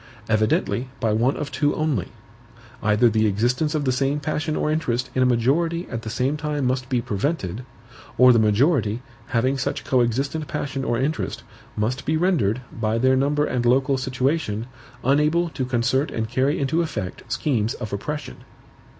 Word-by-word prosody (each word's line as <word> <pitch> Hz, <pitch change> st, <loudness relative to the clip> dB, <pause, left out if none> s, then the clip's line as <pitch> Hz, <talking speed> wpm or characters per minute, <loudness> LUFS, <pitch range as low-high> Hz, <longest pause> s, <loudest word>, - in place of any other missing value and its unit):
Evidently 110 Hz, +3 st, +1 dB
by 110 Hz, -3 st, +1 dB
one 120 Hz, +5 st, +2 dB
of 145 Hz, -2 st, -4 dB
two 145 Hz, +1 st, +1 dB
only. 155 Hz, -, 0 dB, 0.7 s
Either 110 Hz, +3 st, +4 dB
the 110 Hz, -1 st, +2 dB
existence 125 Hz, +9 st, 0 dB
of 150 Hz, -2 st, -1 dB
the 130 Hz, -, +2 dB
same 135 Hz, +3 st, 0 dB
passion 155 Hz, +1 st, -2 dB
or 150 Hz, -, 0 dB
interest 130 Hz, -5 st, -1 dB
in 130 Hz, -, +1 dB
a 130 Hz, -, +5 dB
majority 160 Hz, +9 st, +1 dB
at 115 Hz, -2 st, -3 dB
the 110 Hz, -, -6 dB
same 130 Hz, +5 st, 0 dB
time 150 Hz, -2 st, -2 dB
must 130 Hz, 0 st, -1 dB
be 125 Hz, -3 st, +1 dB
prevented, 110 Hz, -, -2 dB, 0.5 s
or 125 Hz, 0 st, +8 dB
the 115 Hz, -, +4 dB
majority, 110 Hz, +1 st, +2 dB, 0.2 s
having 130 Hz, +3 st, +1 dB
such -, -, -2 dB
coexistent 135 Hz, +5 st, 0 dB
passion 140 Hz, -2 st, -3 dB
or 120 Hz, -2 st, 0 dB
interest, 145 Hz, +5 st, -2 dB, 0.3 s
must 120 Hz, +6 st, -1 dB
be 155 Hz, +3 st, +1 dB
rendered, 145 Hz, -, +1 dB
by 115 Hz, -1 st, -1 dB
their 130 Hz, +2 st, +3 dB
number 145 Hz, +3 st, +2 dB
and 125 Hz, -4 st, -1 dB
local 135 Hz, +3 st, +3 dB
situation, 130 Hz, -3 st, -1 dB, 0.4 s
unable 150 Hz, +6 st, +2 dB
to 135 Hz, -5 st, -3 dB
concert 125 Hz, +3 st, +1 dB
and 110 Hz, -1 st, -3 dB
carry 130 Hz, +5 st, +1 dB
into 140 Hz, +4 st, +1 dB
effect 105 Hz, -, -4 dB
schemes 120 Hz, -7 st, 0 dB
of 110 Hz, -4 st, -6 dB
oppression. 145 Hz, +9 st, -4 dB
130 Hz, 165 wpm, -23 LUFS, 115-150 Hz, 0.7 s, or